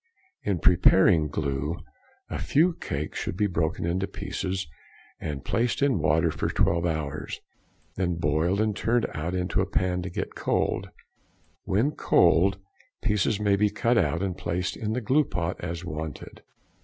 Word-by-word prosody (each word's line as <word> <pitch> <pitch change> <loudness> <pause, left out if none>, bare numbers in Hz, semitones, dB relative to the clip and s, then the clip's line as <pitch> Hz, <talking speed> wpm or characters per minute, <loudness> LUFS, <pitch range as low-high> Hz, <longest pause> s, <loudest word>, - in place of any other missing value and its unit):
In 100 -3 0
preparing 90 -1 +5
glue, 75 +2 -2 0.5
a - - -4
few 170 +5 +3
cakes 75 - -4
should 85 - -4
be 105 - +2
broken 85 -4 -1
into 90 +3 0
pieces 95 0 -3 0.5
and 70 -3 -5
placed 115 +1 0
in 135 -9 +3
water 80 +2 +2
for - - -2
twelve 85 +1 +2
hours, 75 -2 -3 0.6
then 90 -2 0
boiled 80 +4 +1
and 110 -1 +1
turned 120 +2 +1
out 85 +4 -3
into 90 +1 0
a 95 - -1
pan 90 -1 0
to 90 - -5
get - - -4
cold; - - -1 0.8
when 110 +10 +2
cold, 95 - +3 0.5
pieces 105 0 +1
may 100 -1 +3
be 105 +1 +3
cut 115 +4 +1
out - - 0
and 95 -2 -3
placed 90 +2 -2
in 110 0 -3
the 125 - -1
glue 135 +7 +3
pot 85 -8 -3
as 85 0 -4
wanted. 80 -3 -6
90 Hz, 155 wpm, -26 LUFS, 80-105 Hz, 0.8 s, preparing